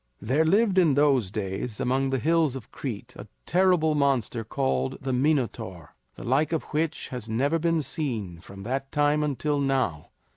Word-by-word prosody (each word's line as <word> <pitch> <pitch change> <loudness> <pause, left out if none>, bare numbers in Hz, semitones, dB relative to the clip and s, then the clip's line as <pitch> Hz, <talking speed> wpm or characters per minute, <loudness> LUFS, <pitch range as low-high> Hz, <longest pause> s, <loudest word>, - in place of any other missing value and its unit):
There 135 +10 +1
lived 195 +2 +3
in 160 -7 +4
those 135 -8 +3
days 100 +2 -4
among 135 +2 +1
the 135 - 0
hills 160 +1 +2
of 130 - -9
Crete 115 -8 -6
a - - -8 0.2
terrible 180 -3 +3
monster 135 -6 +1
called 65 -9 -1
the 130 -1 -3
Minotaur, 120 - -1 0.2
the - - -9
like 140 +6 +1
of 160 - -1
which 155 +1 -1
has 125 -3 -7
never 140 +9 +1
been 165 -1 +1
seen 115 - -3
from 95 +3 -11
that 135 +4 -3
time 145 +1 +2
until 145 0 -1
now. 130 - 0
135 Hz, 170 wpm, -26 LUFS, 110-150 Hz, 0.2 s, in